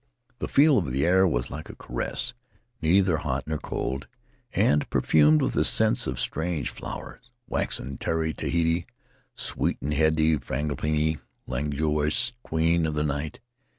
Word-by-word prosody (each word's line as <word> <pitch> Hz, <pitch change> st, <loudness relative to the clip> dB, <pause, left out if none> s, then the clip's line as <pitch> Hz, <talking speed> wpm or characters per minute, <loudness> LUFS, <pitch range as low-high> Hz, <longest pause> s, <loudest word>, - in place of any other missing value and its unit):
The -, -, -3 dB
feel 145 Hz, -1 st, +5 dB
of 80 Hz, -9 st, -3 dB
the 70 Hz, +2 st, +1 dB
air 95 Hz, +2 st, +5 dB
was 60 Hz, -7 st, -1 dB
like 80 Hz, +3 st, -7 dB
a -, -, -9 dB
caress; 120 Hz, -, -4 dB, 0.5 s
neither 90 Hz, +1 st, +3 dB
hot -, -, -2 dB
nor 75 Hz, -1 st, -3 dB
cold, 65 Hz, +1 st, -4 dB, 0.4 s
and 75 Hz, 0 st, +2 dB
perfumed 75 Hz, 0 st, +4 dB
with -, -, 0 dB
the -, -, +2 dB
scents -, -, +4 dB
of 65 Hz, 0 st, -3 dB
strange 80 Hz, -1 st, -2 dB
flowers 125 Hz, -, -9 dB
— 120 Hz, -, -51 dB
waxen 65 Hz, 0 st, -2 dB
Tiare 80 Hz, -1 st, -1 dB
Tahiti, 85 Hz, +3 st, 0 dB, 0.5 s
sweet -, -, 0 dB
and 75 Hz, +2 st, -2 dB
heady 80 Hz, 0 st, +3 dB
frangipani, 75 Hz, +3 st, -1 dB, 0.3 s
languorous 75 Hz, -, 0 dB
Queen 80 Hz, -1 st, +1 dB
of 75 Hz, -, -3 dB
the 75 Hz, -, 0 dB
Night. 75 Hz, -, -3 dB
80 Hz, 150 wpm, -26 LUFS, 75-85 Hz, 0.5 s, feel